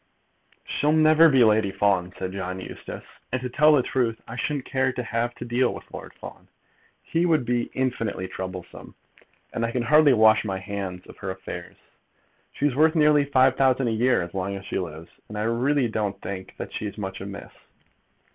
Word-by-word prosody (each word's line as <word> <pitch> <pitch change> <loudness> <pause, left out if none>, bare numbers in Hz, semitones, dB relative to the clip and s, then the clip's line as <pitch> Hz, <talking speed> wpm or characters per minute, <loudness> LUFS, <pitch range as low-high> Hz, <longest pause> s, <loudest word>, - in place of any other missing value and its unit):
"She'll 150 +1 +1
never 155 +1 +6
be 135 -4 +5
Lady 110 -2 +3
Fawn," 95 -2 +1
said 95 -1 -4
John 95 -1 -4
Eustace. - - -8 0.3
"And 130 - 0
to 125 0 -4
tell 150 +4 +5
the 135 -4 +4
truth, 120 -4 -1
I 115 - -7
shouldn't 140 +1 -2
care 130 -1 0
to 125 -1 -4
have 120 +1 -2
to - - -7
deal 120 +1 +1
with - - -9
Lord - - -9
Fawn. - - -11 0.6
He 170 +2 0
would 155 -7 +2
be 120 0 0
infinitely 115 -7 -2
troublesome; 95 -1 -8 0.6
and 115 - -2
I 115 - 0
can 120 +1 -1
hardly 150 +2 +5
wash 110 -2 +5
my 95 -3 -3
hands 95 -2 -6
of - - -14
her 95 - -6
affairs. 95 0 -7 0.8
She's 145 -3 -1
worth 155 +3 +4
nearly 150 -2 +4
£5,000 130 -1 +3
a - - +1
year 120 -1 +2
as 85 - -9
long 95 +1 -3
as 95 0 -8
she - - -2
lives, 80 -2 -7 0.2
and 105 - -7
I 105 - -1
really 125 +4 +1
don't 105 -3 -2
think 95 -1 -7
that - - -7
she's 105 -1 -5
much 95 -2 -5
amiss." 100 +1 -8
115 Hz, 190 wpm, -25 LUFS, 95-130 Hz, 0.8 s, never